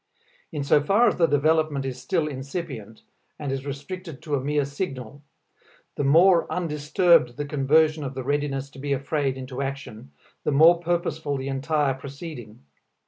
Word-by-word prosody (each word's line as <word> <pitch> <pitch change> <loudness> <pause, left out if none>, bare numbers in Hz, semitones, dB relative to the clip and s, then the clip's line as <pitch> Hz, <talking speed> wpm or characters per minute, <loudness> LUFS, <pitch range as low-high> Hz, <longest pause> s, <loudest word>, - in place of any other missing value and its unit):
In 150 -3 -3
so 145 +1 +4
far 200 +11 +4
as - - -3
the 165 - +4
development 150 -1 +1
is 130 -1 -5
still 155 +4 0
incipient, 135 - -6 0.3
and 145 -2 -4
is 135 +1 -4
restricted 155 +3 -7
to 150 - -5
a 140 - +2
mere 145 0 +1
signal, 140 - -5 0.7
the - - -2
more 170 +5 +5
undisturbed 150 -4 +2
the 145 - -3
conversion 150 +2 +2
of 135 -1 -5
the 130 - -4
readiness 140 0 -2
to 135 - -13
be 140 +1 -1
afraid 140 0 -1
into 130 0 -6
action 135 - -6 0.3
the - - 0
more 165 +4 +6
purposeful 165 -4 -1
the 135 +1 -4
entire 140 +1 0
proceeding. 135 - -9
145 Hz, 160 wpm, -25 LUFS, 135-160 Hz, 0.7 s, more